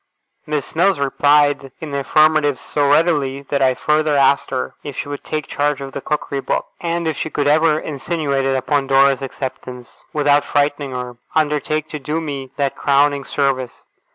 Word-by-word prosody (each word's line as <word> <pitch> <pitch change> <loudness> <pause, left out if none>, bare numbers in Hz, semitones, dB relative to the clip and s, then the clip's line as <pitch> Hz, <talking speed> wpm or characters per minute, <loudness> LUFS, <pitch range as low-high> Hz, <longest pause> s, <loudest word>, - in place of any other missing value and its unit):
Miss 150 -1 -3
Mills 185 0 +3
replied 145 0 +2
in 155 -2 -7
the 140 - -1
affirmative 155 -1 +3
so 145 +1 0
readily, 145 -3 +2
that 140 -1 0
I 130 -1 +3
further 150 +1 +1
asked 140 0 +3
her 130 -1 -3
if 140 -3 -8
she - - -3
would 145 0 -6
take 155 -2 -3
charge 145 -1 -1
of 135 -1 -7
the 140 - -6
Cookery 140 -2 -2
Book; - - -1
and, 170 -1 -2
if 160 - -1
she 160 - -4
ever 150 +2 +3
could - - -10
insinuate 140 -2 -2
it 135 0 +1
upon 135 +1 0
Dora's 135 0 +4
acceptance, 125 -2 -7
without 145 -1 +3
frightening 145 0 0
her, 125 -1 -5 0.2
undertake 155 0 0
to 150 - -5
do 150 +4 -2
me 140 -4 -5
that 140 -2 0
crowning 140 0 +2
service. 135 -3 -2
145 Hz, 180 wpm, -19 LUFS, 135-150 Hz, 0.2 s, Dora's